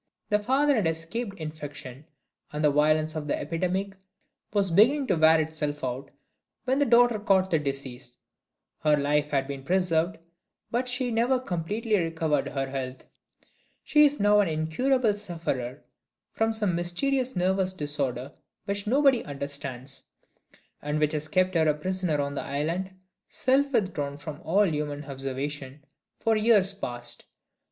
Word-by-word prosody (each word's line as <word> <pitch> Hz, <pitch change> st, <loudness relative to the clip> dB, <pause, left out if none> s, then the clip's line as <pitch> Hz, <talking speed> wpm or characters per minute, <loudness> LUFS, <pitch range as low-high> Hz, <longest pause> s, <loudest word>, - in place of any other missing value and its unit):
The 210 Hz, -, +3 dB
father 270 Hz, +7 st, +2 dB
had 200 Hz, -6 st, +2 dB
escaped 180 Hz, +7 st, -3 dB
infection, 145 Hz, -3 st, -7 dB, 0.5 s
and 150 Hz, +1 st, -3 dB
the 150 Hz, -, +5 dB
violence 155 Hz, +2 st, +2 dB
of 150 Hz, -1 st, -4 dB
the -, -, 0 dB
epidemic 180 Hz, +6 st, -2 dB, 0.6 s
was 200 Hz, -3 st, +1 dB
beginning 255 Hz, -, +5 dB
to 190 Hz, -, +1 dB
wear 160 Hz, 0 st, +5 dB
itself 150 Hz, -2 st, -2 dB
out, 130 Hz, +2 st, -3 dB, 0.6 s
when 265 Hz, +2 st, +1 dB
the 285 Hz, -, +3 dB
daughter 240 Hz, -1 st, +5 dB
caught 190 Hz, -2 st, +2 dB
the 160 Hz, -, +3 dB
disease. 135 Hz, -3 st, -5 dB, 0.6 s
Her 150 Hz, -1 st, +3 dB
life 145 Hz, +1 st, +1 dB
had 135 Hz, -2 st, +1 dB
been 140 Hz, 0 st, -6 dB
preserved, 175 Hz, +2 st, +1 dB, 0.5 s
but 245 Hz, +2 st, 0 dB
she 250 Hz, 0 st, 0 dB
never 240 Hz, +3 st, +2 dB
completely 210 Hz, +2 st, -1 dB
recovered 160 Hz, -4 st, 0 dB
her 135 Hz, -1 st, -2 dB
health. 130 Hz, -1 st, -5 dB, 0.8 s
She 300 Hz, -1 st, +5 dB
is 290 Hz, 0 st, +3 dB
now 205 Hz, +1 st, +5 dB
an 205 Hz, -, +3 dB
incurable 210 Hz, -, +1 dB
sufferer 160 Hz, -10 st, -4 dB, 0.5 s
from 225 Hz, 0 st, +1 dB
some 210 Hz, -4 st, 0 dB
mysterious 255 Hz, +10 st, 0 dB
nervous 185 Hz, +1 st, +1 dB
disorder 140 Hz, -6 st, -2 dB, 0.3 s
which 200 Hz, 0 st, -2 dB
nobody 270 Hz, 0 st, +4 dB
understands, 140 Hz, -2 st, -5 dB, 0.8 s
and 150 Hz, +1 st, -2 dB
which 150 Hz, 0 st, +1 dB
has 155 Hz, 0 st, -2 dB
kept 185 Hz, +2 st, +2 dB
her 160 Hz, -2 st, +3 dB
a 150 Hz, -, +3 dB
prisoner 180 Hz, -1 st, -1 dB
on 140 Hz, 0 st, -1 dB
the 140 Hz, -, -3 dB
island, 165 Hz, +7 st, -2 dB, 0.4 s
self 275 Hz, +2 st, +2 dB
withdrawn 160 Hz, -, -1 dB
from 145 Hz, +2 st, -8 dB
all 195 Hz, +6 st, +3 dB
human 150 Hz, -3 st, -3 dB
observation, 135 Hz, +1 st, -5 dB, 0.3 s
for 225 Hz, -1 st, +1 dB
years 210 Hz, -3 st, +4 dB
past. 120 Hz, -9 st, -5 dB
165 Hz, 145 wpm, -27 LUFS, 145-210 Hz, 0.8 s, the